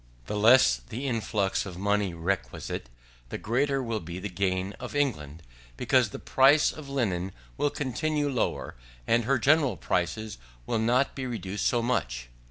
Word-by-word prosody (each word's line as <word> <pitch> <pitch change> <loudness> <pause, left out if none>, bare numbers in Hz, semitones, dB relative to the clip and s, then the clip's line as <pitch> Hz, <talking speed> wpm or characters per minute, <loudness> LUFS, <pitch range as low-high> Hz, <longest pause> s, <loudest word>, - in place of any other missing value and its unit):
The - - -4
less 105 - +6
the 110 - -6
efflux 105 -5 0
of 95 -3 -8
money 100 0 +1
requisite, 85 -7 -3 0.4
the - - -4
greater 135 +4 0
will 115 -2 -2
be 85 0 -7
the 100 +2 -4
gain 95 +1 -1
of - - -7
England; 80 - -1 0.3
because - - +3
the - - -7
price 140 +3 +4
of 150 -3 -10
linen 95 -9 -1 0.2
will 145 - +1
continue 145 +2 -1
lower, 130 -5 -1 0.3
and 115 0 +2
her 135 +2 +3
general 140 -4 +3
prices 105 - -2 0.3
will 115 - 0
not 125 +5 +2
be 130 -1 -4
reduced 105 -4 -2
so 120 -1 +1
much. 60 - -1
110 Hz, 160 wpm, -28 LUFS, 95-130 Hz, 0.4 s, less